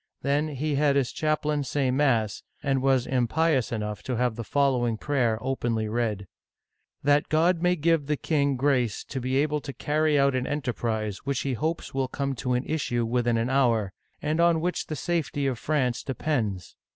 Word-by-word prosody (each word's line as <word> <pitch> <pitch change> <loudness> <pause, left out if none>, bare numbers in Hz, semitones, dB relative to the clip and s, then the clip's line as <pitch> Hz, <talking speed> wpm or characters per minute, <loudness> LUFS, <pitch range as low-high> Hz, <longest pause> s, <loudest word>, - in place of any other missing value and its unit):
Then 145 +2 +1
he 150 +1 -2
had 140 0 +3
his 135 -3 +1
chaplain 150 -1 0
say 135 -1 0
mass, 125 -7 +1 0.2
and 135 -1 +1
was 130 -2 +2
impious 130 +2 +1
enough 105 -2 -3
to 125 - -3
have 120 -1 0
the 115 - -5
following 125 -3 +1
prayer 120 -4 +1
openly 120 -4 -1
read: 105 -3 -1 0.4
" - - -52
That 145 +1 +3
God 165 +3 +3
may 180 0 +3
give 165 -2 +1
the 150 0 0
king 140 -3 +1
grace 125 -5 +1
to 135 - -5
be 130 +1 -1
able 150 +1 +1
to 140 - -7
carry 150 +1 +1
out 140 -1 +3
an 130 0 -1
enterprise 115 -7 -2
which 140 -1 -2
he 135 - -1
hopes 160 +8 -3
will 135 -1 0
come 140 +1 -2
to 125 +2 -1
an 125 +2 0
issue 120 -7 -1
within 120 0 +1
an 115 +3 0
hour, 115 -7 +2 0.3
and 155 +2 0
on 170 -1 +4
which 180 +2 -2
the 155 - -3
safety 155 -3 -1
of 130 -4 -1
France 130 -5 0
depends 120 -8 -2
135 Hz, 190 wpm, -26 LUFS, 120-150 Hz, 0.4 s, on